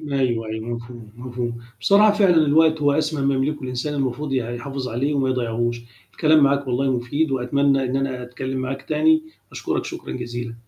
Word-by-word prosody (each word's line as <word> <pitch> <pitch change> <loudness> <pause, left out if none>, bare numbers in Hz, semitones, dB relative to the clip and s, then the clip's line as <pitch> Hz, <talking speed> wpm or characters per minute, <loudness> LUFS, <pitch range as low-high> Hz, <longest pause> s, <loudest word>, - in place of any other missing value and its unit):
أيوه، 130 -7 -1
أيوه، 110 +1 -5
مفهوم، 120 -2 -7
مفهوم. 120 -1 -5 0.2
بصراحة 205 - +5
فعلًا 195 -4 +4
الوقت 160 0 +4
هو 145 0 +4
أسمى 155 -2 0
ما 140 - +2
يملكه 140 +2 -1
الإنسان 130 +4 -3
المفروض 135 +1 -2
ي - - +1 0.2
يحافظ 135 +1 -5
عليه 135 +6 -1
وما 135 -2 +1
يضيّعوش. 120 -1 -1 0.3
الكلام 155 -2 +4
معاك 140 0 +1
والله 130 +2 +1
مفيد 140 +5 -1
وأتمنى 135 +1 +1
إن 130 +1 -1
أنا 130 -2 -2
أتكلِّم 130 +2 -5
معاك 135 +1 -4
تاني، 315 0 +3 0.3
أشكرك - - -2
شكرًا 345 - -7
جزيلًا. 120 -1 -5
135 Hz, 175 wpm, -22 LUFS, 120-145 Hz, 0.3 s, بصراحة